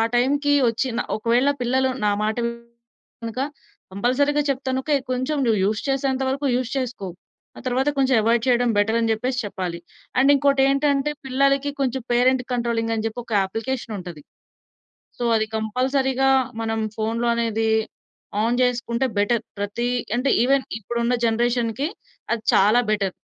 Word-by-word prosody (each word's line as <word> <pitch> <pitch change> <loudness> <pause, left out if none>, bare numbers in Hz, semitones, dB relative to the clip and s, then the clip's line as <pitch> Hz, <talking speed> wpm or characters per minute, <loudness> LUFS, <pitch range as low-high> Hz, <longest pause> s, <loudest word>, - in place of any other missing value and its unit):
టైంకి 285 +4 +2 0.2
ఒచ్చి 235 +3 -1
న - - +1 0.2
ఒకవేళ 240 +5 +2
పిల్లలు 260 +2 +1
నా 210 - +3
మాట 215 +1 0
వినక 235 0 -9 0.5
కంపల్సరీ‌గా 280 +8 +1
చెప్తాను 260 -1 -1
ఓకే. 300 +2 0 0.2
కొంచెం 255 +4 -1
నువ్వు 220 -2 +3
యూజ్ 210 +1 0
చేసేంత 270 -1 0
వరకు 275 +2 -1
యూజ్ 250 -1 -2
చేసుకో. 245 -7 -3 0.5
ఆ - - -9
తరువాత 260 +3 +1
కొంచెం 265 -1 +3
అవాయిడ్ 230 +1 +2
చేయడం 245 -1 +3
బెటర్ 220 +2 +2
అని 225 -1 +1
జెప్పేసి 250 +4 -2
చెప్పాలి. 180 -4 -4 0.4
అండ్ 270 +2 +5
ఇంకోటేంటంటే 275 +1 +2
పిల్లలకి 275 +2 +2
కొంచెం 265 -1 -1
పేరెంట్ 250 +1 +3
కంట్రోలింగ్ 235 -2 -1
అని 220 - -2
జెప్పి, 225 +2 -4
ఒక 230 - -10
అప్లికేషన్ 225 +2 -4
ఉంటది. 175 -5 -9 1.0
సో - - -3
అది 220 - +2
కంపల్సరీ‌గా 260 +4 +1 0.3
మనం 225 0 -1 0.2
ఫోనులో 225 +2 -1
అనేది 225 -1 0 0.7
ఆన్ 235 +2 +1
జేసుకుంటే 245 0 0
బెటర్ 210 +3 +1 0.2
ప్రతి 205 +4 -2 0.3
అంటే, 255 +3 +1
ఈవెన్ 270 +1 +3 0.2
ఇప్పుడు 235 +3 -4
ఉన్న 240 +1 +1
జనరేషన్‌కి 235 +3 0 0.5
అది 230 - -3
చాలా 210 +5 +5
బెటర్. 200 -3 0
245 Hz, 145 wpm, -23 LUFS, 225-265 Hz, 1.0 s, అండ్